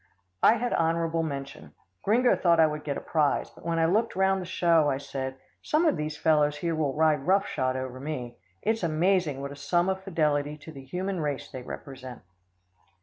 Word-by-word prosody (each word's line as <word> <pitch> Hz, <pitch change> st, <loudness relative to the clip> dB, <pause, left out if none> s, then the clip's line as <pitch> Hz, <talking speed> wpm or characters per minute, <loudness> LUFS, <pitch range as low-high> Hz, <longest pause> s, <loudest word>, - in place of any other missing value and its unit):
I 220 Hz, -, +6 dB
had 240 Hz, +1 st, -1 dB
honourable 165 Hz, 0 st, +1 dB
mention. 140 Hz, -3 st, -6 dB, 0.3 s
Gringo 240 Hz, +4 st, +3 dB
thought 170 Hz, -2 st, +3 dB
I 160 Hz, -, +7 dB
would 150 Hz, -1 st, -3 dB
get 140 Hz, -2 st, -3 dB
a -, -, -5 dB
prize, 150 Hz, -3 st, 0 dB
but -, -, -17 dB
when 170 Hz, 0 st, -1 dB
I 165 Hz, -, +3 dB
looked 215 Hz, +7 st, +1 dB
round 190 Hz, 0 st, +2 dB
the 180 Hz, -, -7 dB
show, 165 Hz, -4 st, +3 dB
I 135 Hz, -, 0 dB
said, 130 Hz, -1 st, -5 dB, 0.3 s
"Some 310 Hz, +3 st, +1 dB
of 310 Hz, -, +3 dB
these 150 Hz, 0 st, -4 dB
fellows 150 Hz, -2 st, +2 dB
here 170 Hz, +2 st, -1 dB
will 150 Hz, -4 st, -1 dB
ride 155 Hz, -2 st, +2 dB
rough 195 Hz, +2 st, +4 dB
shod 130 Hz, -7 st, -1 dB
over 130 Hz, -1 st, -5 dB
me. 130 Hz, -4 st, -5 dB, 0.3 s
It's 225 Hz, +1 st, +1 dB
amazing 165 Hz, -3 st, +1 dB
what 140 Hz, 0 st, -5 dB
a -, -, -8 dB
sum 175 Hz, +6 st, +1 dB
of 190 Hz, 0 st, -2 dB
fidelity 150 Hz, -5 st, 0 dB
to 155 Hz, +2 st, -11 dB
the 135 Hz, -3 st, -10 dB
human 180 Hz, +7 st, -3 dB
race 145 Hz, -3 st, -3 dB
they 130 Hz, -, -6 dB
represent." 130 Hz, -2 st, -9 dB
155 Hz, 205 wpm, -27 LUFS, 140-180 Hz, 0.3 s, I